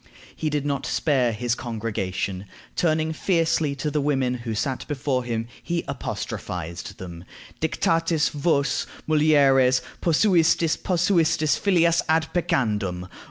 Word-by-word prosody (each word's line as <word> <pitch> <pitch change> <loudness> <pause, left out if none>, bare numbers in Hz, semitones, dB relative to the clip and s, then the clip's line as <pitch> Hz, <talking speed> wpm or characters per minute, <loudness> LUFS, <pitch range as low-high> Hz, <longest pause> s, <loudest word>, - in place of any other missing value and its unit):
He 155 - -2
did 145 -1 -1
not 140 -2 -2
spare 130 -6 +1
his 120 +2 -1
congregation. 105 -5 -3 0.3
Turning 160 -1 +1
fiercely 165 -4 +1
to 150 +2 -3
the 150 0 0
women 135 -3 +1
who 115 -3 -4
sat 130 +4 -2
before 135 -3 -1
him, 115 -1 -3
he 170 -1 -2
apostrophized 85 -1 -5
them: 85 -2 -8 0.4
"Dicatis, 165 0 +1
vos, 145 -1 0 0.2
mulieres, 140 -4 +4 0.2
posuistis, 170 -2 +3
posuistis 170 -4 +2
filias 170 -4 +3
ad 160 0 +1
peccandum? 105 - -1
145 Hz, 115 wpm, -24 LUFS, 120-160 Hz, 0.4 s, mulieres